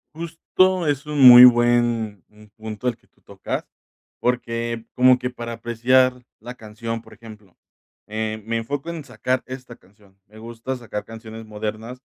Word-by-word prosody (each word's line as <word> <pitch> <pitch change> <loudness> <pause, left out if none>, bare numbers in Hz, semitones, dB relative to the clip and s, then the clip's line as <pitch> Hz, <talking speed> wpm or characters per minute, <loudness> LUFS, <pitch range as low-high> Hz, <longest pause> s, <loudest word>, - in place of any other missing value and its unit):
Justo 170 +2 0
es 145 0 -1
un 150 -2 -2
muy 125 0 +12
buen 120 -4 +2 0.4
punto 110 +3 -4
el 120 - -6
que - - -33
tú - - -36
tocas, - - -6 0.6
porque 115 -1 -2
como 125 0 +5
que 125 0 -4
para 120 -1 -7
apreciar 125 +2 +1 0.2
la 125 +1 -9
canción, 115 +1 -6
por - - -17
ejemplo, 105 -5 -15 0.5
eh, 110 0 -4
me 115 0 -2
enfoco 140 +7 -4
en 160 -4 -7
sacar 130 0 -2
esta 130 -2 -10
canción. 100 0 -26
Me 110 +1 -18
gusta 115 +3 -6
sacar 115 -4 -7
canciones 115 0 -10
modernas 110 +3 -6
120 Hz, 155 wpm, -22 LUFS, 110-125 Hz, 0.6 s, muy